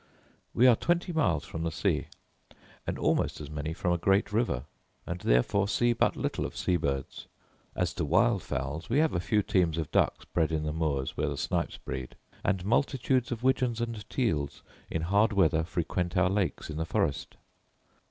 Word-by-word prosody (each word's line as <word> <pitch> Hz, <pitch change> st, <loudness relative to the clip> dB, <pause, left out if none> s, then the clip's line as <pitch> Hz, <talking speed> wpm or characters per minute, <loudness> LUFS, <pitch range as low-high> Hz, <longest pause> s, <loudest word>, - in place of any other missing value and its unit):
We 125 Hz, -, +5 dB
are 125 Hz, -2 st, +8 dB
twenty 175 Hz, -, 0 dB
miles 90 Hz, -, +1 dB
from 80 Hz, -, -6 dB
the 85 Hz, 0 st, -1 dB
sea, -, -, 0 dB, 0.8 s
and -, -, -2 dB
almost -, -, +1 dB
as 75 Hz, -1 st, -8 dB
many 75 Hz, +1 st, -3 dB
from 90 Hz, +2 st, -1 dB
a 85 Hz, -, -1 dB
great 95 Hz, +3 st, +2 dB
river, 105 Hz, -, +1 dB, 0.4 s
and 85 Hz, +1 st, -4 dB
therefore 95 Hz, +13 st, +2 dB
see 120 Hz, +3 st, +2 dB
but 115 Hz, -, +2 dB
little -, -, -2 dB
of -, -, -5 dB
sea 90 Hz, -, +1 dB
birds. 70 Hz, -5 st, -3 dB, 0.5 s
As -, -, 0 dB
to -, -, -2 dB
wild 100 Hz, +6 st, +3 dB
fowls, 70 Hz, +5 st, -4 dB
we 125 Hz, -, +2 dB
have 155 Hz, +1 st, +3 dB
a -, -, +1 dB
few 105 Hz, +4 st, +1 dB
teams 90 Hz, -6 st, +1 dB
of 80 Hz, -3 st, -3 dB
ducks -, -, +1 dB
bred 80 Hz, -2 st, 0 dB
in 80 Hz, -1 st, -1 dB
the 75 Hz, 0 st, -2 dB
moors 75 Hz, -5 st, -1 dB
where -, -, 0 dB
the -, -, -4 dB
snipes -, -, -1 dB
breed; 65 Hz, -1 st, -6 dB, 0.3 s
and 95 Hz, -3 st, 0 dB
multitudes 130 Hz, +2 st, +1 dB
of 120 Hz, 0 st, -4 dB
widgeons 130 Hz, -3 st, +2 dB
and 115 Hz, -3 st, -4 dB
teals 75 Hz, -, -1 dB, 0.3 s
in 80 Hz, -, -2 dB
hard 100 Hz, +5 st, +3 dB
weather 90 Hz, -5 st, +3 dB
frequent 85 Hz, +1 st, -2 dB
our 90 Hz, 0 st, +3 dB
lakes 95 Hz, -5 st, -1 dB
in 75 Hz, -, -5 dB
the 80 Hz, -, -1 dB
forest. -, -, -1 dB
90 Hz, 190 wpm, -29 LUFS, 80-115 Hz, 0.8 s, are